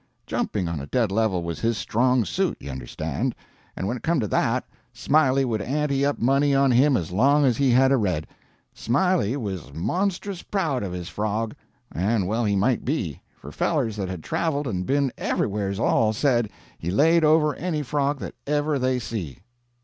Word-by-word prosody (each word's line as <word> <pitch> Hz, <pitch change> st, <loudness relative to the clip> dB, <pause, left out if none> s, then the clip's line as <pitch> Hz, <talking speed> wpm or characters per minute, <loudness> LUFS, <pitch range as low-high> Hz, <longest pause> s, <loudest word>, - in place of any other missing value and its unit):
Jumping 95 Hz, -4 st, -2 dB
on 85 Hz, -2 st, -3 dB
a 70 Hz, -, -7 dB
dead 115 Hz, -, +1 dB
level 100 Hz, -4 st, +1 dB
was 85 Hz, -1 st, -4 dB
his 115 Hz, -1 st, 0 dB
strong 125 Hz, +3 st, +2 dB
suit, 190 Hz, -, -1 dB
you 70 Hz, -, -7 dB
understand; 65 Hz, -2 st, -3 dB, 0.4 s
and 95 Hz, -, -3 dB
when 120 Hz, -, -1 dB
it -, -, -12 dB
come 165 Hz, -2 st, +1 dB
to 110 Hz, -, -1 dB
that, -, -, +1 dB, 0.3 s
Smiley 135 Hz, -3 st, +2 dB
would 110 Hz, -4 st, -1 dB
ante 140 Hz, +4 st, 0 dB
up 145 Hz, 0 st, +1 dB
money 140 Hz, +3 st, +2 dB
on 135 Hz, -1 st, +4 dB
him 130 Hz, +2 st, +4 dB
as 85 Hz, 0 st, -4 dB
long 140 Hz, +9 st, +4 dB
as 125 Hz, -4 st, +2 dB
he 140 Hz, -2 st, +2 dB
had 130 Hz, +2 st, +5 dB
a 135 Hz, -, +4 dB
red. 90 Hz, -9 st, -1 dB, 0.5 s
Smiley 140 Hz, -, +1 dB
was 95 Hz, -, -5 dB
monstrous 185 Hz, -, -2 dB
proud 160 Hz, -11 st, -1 dB
of 95 Hz, -, -4 dB
his 90 Hz, -1 st, -5 dB
frog, 110 Hz, +1 st, -2 dB, 0.4 s
and 100 Hz, +3 st, 0 dB
well 115 Hz, +3 st, 0 dB
he 100 Hz, -1 st, +1 dB
might 115 Hz, +5 st, +1 dB
be, 105 Hz, -, -2 dB, 0.2 s
for -, -, -10 dB
fellers 110 Hz, -2 st, 0 dB
that 95 Hz, -3 st, -3 dB
had 90 Hz, -4 st, -6 dB
traveled 150 Hz, -3 st, -1 dB
and 90 Hz, -7 st, -3 dB
been 140 Hz, -1 st, +1 dB
everywheres 100 Hz, -1 st, -1 dB
all 110 Hz, -2 st, +2 dB
said 120 Hz, -2 st, +1 dB, 0.3 s
he 85 Hz, -, -4 dB
laid 160 Hz, -, +4 dB
over 155 Hz, -1 st, +4 dB
any 155 Hz, -2 st, -2 dB
frog 145 Hz, +1 st, 0 dB
that -, -, -6 dB
ever 145 Hz, 0 st, +1 dB
they 130 Hz, 0 st, +1 dB
see. 105 Hz, -, -5 dB
125 Hz, 190 wpm, -24 LUFS, 100-145 Hz, 0.5 s, had